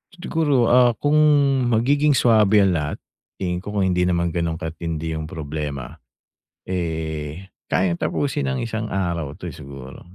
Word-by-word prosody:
Siguro, 155 -9 +1
ah, 125 -1 +6
kung 145 +6 +1 0.5
magiging 140 +6 +3
swabe 110 -4 +5
ang 95 - +3
lahat 75 -2 -2 0.4
tingin 90 -2 -2
ko 105 - -8
kung 100 -2 +2
hindi 90 0 +1
naman 85 -1 +1
ganun 85 -2 -1
katindi 80 0 -4
'yung 80 0 -4
problema, 75 -4 -5 0.7
eh, 80 -1 -4 0.2
kayang 90 -2 +1
tapusin 145 0 -1
ng 130 -3 -2
isang 110 -1 -3
araw 85 -6 -2
'to, - - -9
eh, - - -13
siguro. 70 -1 -10
90 Hz, 150 wpm, -22 LUFS, 80-115 Hz, 0.7 s, ah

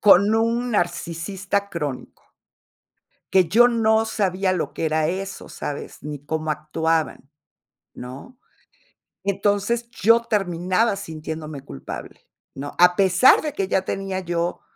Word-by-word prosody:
con 200 +1 +6
un 230 +2 +1
narcisista 190 +2 -2
crónico 150 -8 -6 1.0
que 185 -3 +5
yo 240 +7 +6
no 220 -1 +3
sabía 190 -3 0
lo 180 -3 -2
que 165 - -2
era 155 0 +1
eso, 195 +3 -4
¿sabes?, 145 - -6
ni 150 -1 -5
cómo 155 +1 -2
actuaban, 155 -1 -1 0.6
¿no? 135 - -10 0.9
Entonces, 205 +4 0
yo 230 +1 +4
terminaba 195 +1 +1
sintiéndome 155 -4 -6
culpable, 70 - -8 0.3
¿no?, 140 +1 -6
a 180 0 +6
pesar 195 +5 +5
de 305 - -3
que 195 -9 -2
ya 190 0 +1
tenía 195 -1 -3
yo, 175 0 -2
185 Hz, 120 wpm, -23 LUFS, 160-205 Hz, 1.0 s, con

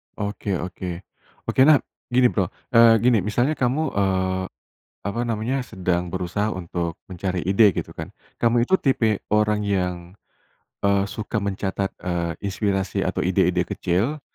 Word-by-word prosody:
Oke 100 -2 -3
oke, 90 -1 -6 0.5
oke 130 - +2
nah 155 -2 +8 0.3
gini, 125 0 +4
Bro, 95 -4 0 0.2
eee, 115 -1 +7
gini 120 -3 +5
misalnya 120 - +1
kamu, 130 +5 +1
eee, 95 -1 0 0.6
apa 100 +4 -3
namanya 115 +4 -1
sedang 90 -4 -1
berusaha 95 +4 -2
untuk 85 -2 -3 0.2
mencari 90 0 -2
ide, 95 +1 +4
gitu - - -4
kan, - - -7 0.3
kamu 120 0 +3
itu 190 +10 +2
tipe 110 -6 +2
orang 105 0 +3
yang, 90 -3 0 0.9
eee, 100 -1 +3
suka 105 0 -3
mencatat, 100 0 -2
eee, 85 -2 -1
inspirasi 95 -1 -1
atau - - -1
ide-ide 90 -1 +2
kecil, 95 - -1
100 Hz, 140 wpm, -23 LUFS, 90-115 Hz, 0.9 s, nah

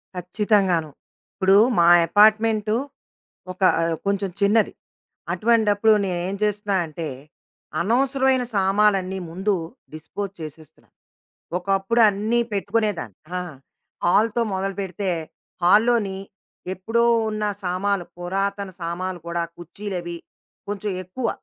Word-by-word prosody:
ఖచ్చితంగాను. 180 -2 +1 0.4
ఇప్పుడు 190 0 +3 0.2
మా 170 - +5 0.2
యపార్ట్‌మెంటు 215 +3 +4 0.8
ఒక 185 - -13 0.2
ఆహ్, 165 0 0
కొంచెం 200 0 0
చిన్నది. 210 +2 +3 0.6
అటువంటప్పుడు 220 -1 +3
నేనేం 180 +1 -2
చేస్తున్నా 205 -1 0
అంటే, 160 +1 -5 0.7
అనవసరమైన 260 +4 +2
సామాలన్నీ 195 -1 +2
ముందు 190 +5 0 0.4
డిస్‌పోజ్ 185 +5 -6
చేసేస్తున్నా. 155 0 -11 0.7
ఒకప్పుడు 195 +5 0
అన్నీపెట్టుకునేదాన్ని. 210 - -1 0.2
ఆ! - - -2 0.6
హాల్‌తో 220 +6 +3
మొదలుపెడితే, 195 0 -3 0.5
హాల్‌లోని 210 +1 +3 0.6
ఎప్పుడో 225 +5 0 0.2
ఉన్న 215 0 -2 0.2
సామాలు 185 +1 -1
పురాతన 195 +2 -2
సామాలు 175 +2 -3
కూడా, 170 0 -1
కుర్చీలవి 175 0 -6 0.5
కొంచెం 205 0 -3
ఎక్కువ. 225 +7 -4
195 Hz, 90 wpm, -23 LUFS, 180-215 Hz, 0.8 s, మా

